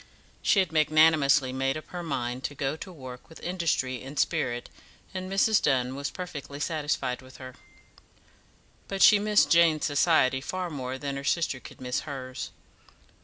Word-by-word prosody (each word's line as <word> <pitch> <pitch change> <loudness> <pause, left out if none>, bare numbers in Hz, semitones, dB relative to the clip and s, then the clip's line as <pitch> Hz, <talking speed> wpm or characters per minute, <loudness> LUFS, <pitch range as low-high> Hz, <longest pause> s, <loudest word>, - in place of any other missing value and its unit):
She - - +3
had 185 -4 +2
magnanimously 155 -4 +4
made 135 +2 0
up 155 - -8
her 180 - -5
mind 130 -5 -3
to 145 - -4
go 135 +1 -1
to 185 - -9
work 130 -6 -10
with 160 - -13
industry 165 -8 -1
and 135 +3 -9
spirit, 120 -7 0 0.5
and 185 0 -5
Mrs. 205 +2 +3
Dunn 130 -2 +1
was 140 +1 -3
perfectly 145 -6 -7
satisfied 145 -5 -2
with 130 0 -14
her. 130 -1 -9 1.3
But 195 -1 +1
she 210 - +8
missed 210 0 +3
Jane's 165 -2 +5
society 145 -3 +3
far 180 +4 -4
more 130 -3 -4
than 140 0 -4
her 140 - -6
sister 140 -2 0
could - - -13
miss 125 0 -2
hers. 130 -3 -6
145 Hz, 165 wpm, -27 LUFS, 130-170 Hz, 1.3 s, she